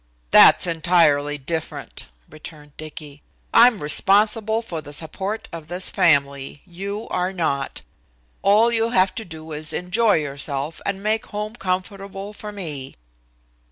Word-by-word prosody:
"That's - - +7
entirely 160 -4 +2
different," 160 +3 -6 0.2
returned 150 -1 -13
Dicky. 150 -2 -10 0.3
"I'm 235 -6 +6
responsible 215 +7 +3
for 170 -8 -6
the 145 0 -9
support 195 +8 -4
of 165 -2 -8
this 180 +2 +2
family. 140 -3 +1
You 200 +4 -6
are 180 +1 -1
not. 140 -7 -2 0.6
All 215 +4 +4
you 230 0 +1
have 190 -5 +2
to 225 - -5
do 160 -4 -10
is 155 +1 -5
to - - -1
enjoy 205 +5 +2
yourself 145 0 -3
and 200 0 -3
make 215 +1 0
home 210 +2 -5
comfortable 195 0 -4
for 210 0 -8
me." 150 -10 -7
180 Hz, 135 wpm, -22 LUFS, 150-205 Hz, 0.6 s, That's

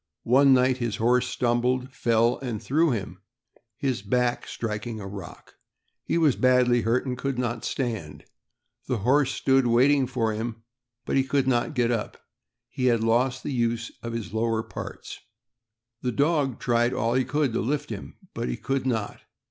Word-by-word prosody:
One 135 +3 +5
night 130 0 +4
his 120 -3 -1
horse 125 +2 +2
stumbled, 125 +1 0
fell, 115 -2 +2
and 120 -5 -4
threw 155 +8 +2
him, 95 -7 -4 0.6
his 130 -7 -1
back 120 +4 0
striking 110 0 -4
a 100 - -7
rock. 95 -3 -9 0.5
He - - 0
was 155 -6 +3
badly 125 -1 +3
hurt, 115 +5 +1
and 125 -1 -2
could 135 +1 -3
not 120 -2 -2
stand. 110 - -4 0.6
The 125 - 0
horse 135 +1 +3
stood 135 -2 +2
waiting 130 +3 +4
for 115 -3 -1
him, 110 +1 -5 0.4
but - - 0
he 135 - +4
could 135 0 0
not 130 +5 +1
get 120 -1 +2
up; 115 -3 -2
said - - -23 0.5
he 130 - -3
had 115 -3 +3
lost 125 +3 +1
the 145 - -3
use 115 -1 -1
of 115 0 -5
his 115 -3 -5
lower 110 0 0
parts. - - -8 0.8
The 125 - -1
dog 140 -1 +1
tried 120 +1 +1
all 115 0 0
he 130 +1 +2
could 140 -1 0
to - - 0
lift 145 +2 -2
him, 100 - -7 0.2
but - - -3 0.2
could 135 -1 -1
not. 110 -5 -2
125 Hz, 170 wpm, -26 LUFS, 115-130 Hz, 0.8 s, One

